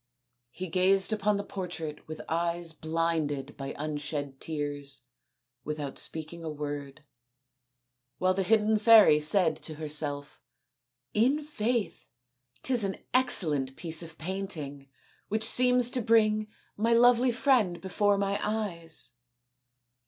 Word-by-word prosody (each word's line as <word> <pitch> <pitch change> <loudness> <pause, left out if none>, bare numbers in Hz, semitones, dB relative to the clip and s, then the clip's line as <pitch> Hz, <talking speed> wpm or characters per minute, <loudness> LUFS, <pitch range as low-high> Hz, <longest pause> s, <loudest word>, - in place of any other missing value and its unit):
He 185 +9 -7
gazed 190 +4 +3
upon 210 -1 +1
the 200 - -3
portrait 170 -6 -6
with 155 0 -7
eyes 170 0 -1
blinded 160 -3 -2
by 135 0 -6
unshed 145 -2 -4
tears 145 -3 -3 0.6
without 150 -2 -5
speaking 160 +1 -4
a 160 - -4
word, 145 -1 -6 1.1
while 185 +3 +2
the 195 - -1
hidden 215 +2 +2
fairy 215 -8 +7
said 160 +2 +2
to 155 - -8
herself, 150 -1 -3 0.4
" 125 +1 -58
In 295 +3 0
faith, 235 -6 -2 0.6
'tis 250 -4 +2
an 195 -1 -2 0.2
ex 255 -5 +4
cellent 135 -4 -2
piece 165 -2 -1
of 165 -1 -10
painting 155 -7 -5 0.4
which 215 +1 -1
seems 250 +1 +5
to 250 - +1
bring 215 -1 +3 0.3
my 230 +3 +1
lovely 245 +1 +5
friend 235 -8 +2
before 200 +2 +1
my 200 0 -1
eyes." 190 - -4
170 Hz, 125 wpm, -28 LUFS, 150-215 Hz, 1.1 s, fairy